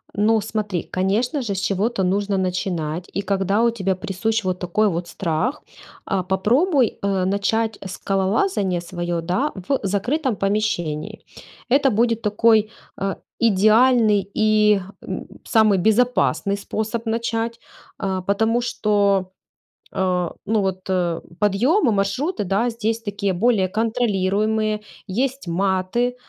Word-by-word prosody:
Ну, 215 +2 +3
смотри, 205 -4 -3
конечно 215 +10 0
же, 220 -5 -2
с 190 - -2
чего-то 200 +2 0
нужно 200 +2 0
начинать, 180 -3 -2
и, 200 - -1
когда 195 +1 0
у 235 - +4
тебя 195 -5 -1
присущ 215 +5 -2
вот 185 -1 -2
такой 185 +5 +1
вот 170 -1 -3
страх, 195 - -2 0.5
э, 195 -2 0
попробуй, 245 - +2
э, 195 -2 0
начать 215 +3 0
скалолазание 195 - 0
своё, 175 -1 -3
да, 185 - -1 0.2
в 275 - +1
закрытом 235 +7 0
помещении. 200 -2 -1 0.5
Это 275 0 +4
будет 230 +1 +1
такой, 215 0 +3 0.3
э, 195 -1 -2 0.2
идеальный 215 -1 +4
и, 215 -2 +3 0.2
м, - - -5 0.2
самый 215 -3 +3
безопасный 210 -1 +2
способ 220 +3 -3
начать, 230 0 -2 0.4
э, 190 -2 -2
потому 220 +4 +2
что, 200 -5 +1 0.6
э, 180 -2 0 0.2
ну, 215 +1 +1
вот 190 -1 -2 0.6
подъемы, 240 - +3
маршруты, 210 - -1
да, 200 +6 +1
здесь 225 0 -2
такие 200 -3 -2
более 200 0 +2
контролируемые, 215 0 0 0.3
есть 255 +4 -2
маты, 190 +7 0
205 Hz, 120 wpm, -22 LUFS, 190-230 Hz, 0.6 s, у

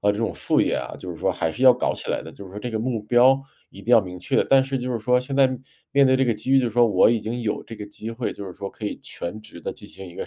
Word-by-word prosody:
呃， 105 0 +3
这 105 - -5
种 115 - -1
副 - - +1
业 - - +1
啊， - - -4
就 - - -8
是 - - -7
说 - - 0
还 80 - -1
是 125 +11 -6
要 130 - +9
搞 125 - -1
起 - - -6
来 - - -1
的， - - -9
就 100 - -11
是 95 - -12
说 100 - -7
这 120 +3 -5
个 110 - -2
目 115 -1 -2
标 125 +4 +5 0.3
一 100 - -12
定 115 - -4
要 115 - +8
明 90 -1 -8
确。 90 - +1
但 135 -1 +5
是 135 0 -3
就 125 0 -3
是 120 - -1
说 125 +3 +2
现 125 +2 -5
在 135 0 +5 0.5
面 140 0 +5
对 130 - +4
这 135 - +2
个 120 - +2
机 105 +5 -5
遇， 135 - +6
就 125 - 0
是 - - -2
说 120 +1 +5
我 105 - +4
已 115 -1 +2
经 115 +3 -4
有 110 -3 -2
这 115 - -9
个 105 - -7
机 110 +2 -8
会， 115 +1 -3
就 100 - -8
是 95 - -7
说 100 +2 -6
可 105 - -10
以 105 - -3
全 105 +5 -7
职 105 -5 -13
地 - - -3
进 - - -13
行 95 - -11
一 85 - -12
个 - - -5
115 Hz, 375 characters per minute, -23 LUFS, 105-125 Hz, 0.5 s, 要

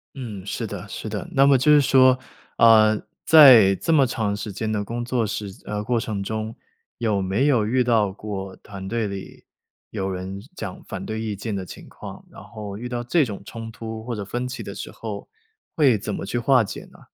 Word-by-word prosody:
嗯， 110 -8 -7
是 - - -3
的 - - -7
是 - - -6
的。 - - -4
那 135 +1 +4
么 140 -1 +6
就 130 +4 +3
是 150 - +7
说， 130 -2 +5 0.4
呃， 110 -2 +6 0.2
在 130 -11 +9
这 165 - 0
么 140 -4 +5
长 110 -4 -1
时 105 +1 -5
间 110 +3 -3
的 105 -1 -1
工 120 +3 -4
作 120 -2 0
时 105 -1 -4 0.2
呃， 105 -1 -3
过 120 +1 0
程 105 -3 -3
中， 110 +2 -4 0.4
有 110 -4 0
没 95 +8 0
有 120 -7 +3
遇 125 +4 +1
到 115 -5 +2
过 95 -1 -6
团 95 -1 -9
队 115 0 -1
里 100 -1 -8 0.4
有 95 0 -3
人 95 +1 -5
讲 95 - -7
反 - - -7
对 110 0 -4
意 110 -2 -3
见 100 +1 -4
的 95 -1 -4
情 - - -11
况， - - -10
然 - - -13
后 105 -3 -8
遇 120 +3 -6
到 120 -1 -3
这 155 +7 +3
种 105 -7 -5
冲 115 +3 -8
突 110 0 -7
或 120 +1 -4
者 105 -3 -4
分 120 +5 -3
歧 125 +1 -5
的 - - -7
时 - - -7
候， - - -7 0.5
会 135 -8 +5
怎 105 +1 -5
么 - - -4
去 110 +5 -3
化 125 +1 +4
解 105 - -5
呢？ - - -18
110 Hz, 230 characters per minute, -23 LUFS, 100-125 Hz, 0.5 s, 在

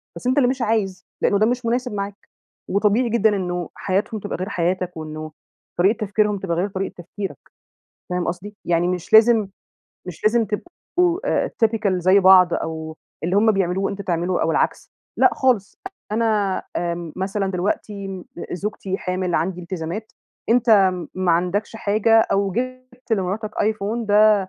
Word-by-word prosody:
بس - - -5
أنت 255 +3 +2
اللي 250 -3 +4
مش 260 -1 -2
عايز، 210 -5 -1 0.2
لأنه 200 - +3
ده 215 - +4
مش 245 +1 -1
مناسب 245 0 -1
معاك، 200 0 -6 0.4
وطبيعي 210 +5 +2
جدًا 220 -2 +3
إنه 180 -3 -3
حياتهم 205 +3 -1
تبقى - - -4
غير 185 +3 -4
حياتك، 180 0 -1
وإنه 155 0 -6 0.5
طريقة 195 +5 +3
تفكيرهم 210 0 +1
تبقى 175 -3 -2
غير 185 +4 +1
طريقة 195 0 -4
تفكيرك، 190 +3 -6 0.7
فاهم 180 0 -1
قصدي؟ 200 +4 -5
يعني 175 0 +2
مش 180 +2 -3
لازم 220 -1 +6 0.6
مش 180 +2 -9
لازم 230 +2 +4
تبقوا 350 - -1
آآ - - 0
typical 220 -3 +1
زي 185 +3 +5
بعض، 185 -2 +7
أو 160 -1 -4 0.3
اللي 180 +3 +1
هُم 220 +1 +5
بيعملوه 195 0 0
أنت 200 0 -5
تعمله 175 0 0
أو - - +1
العكس، - - 0 0.3
لأ - - +5
خالص 245 -7 +1 0.3
أنا 215 -4 +1
آمم 170 -2 -3
مثلًا 195 +1 -1
دلوقتي 195 0 -3 0.3
زوجتي 195 0 -3
حامل، 180 -1 -2
عندي 180 +2 -1
التزامات، 180 +4 -5 0.4
أنت 220 -6 +5 0.2
ما 185 -2 +1
عندكش 180 +6 -1
حاجة، 220 +1 +3
أو 195 -1 +1
جِبت 255 +1 -5
لمراتك 205 +2 -1
آيفون، 215 +2 -1
ده 210 +1 +6
200 Hz, 155 wpm, -22 LUFS, 180-220 Hz, 0.7 s, بعض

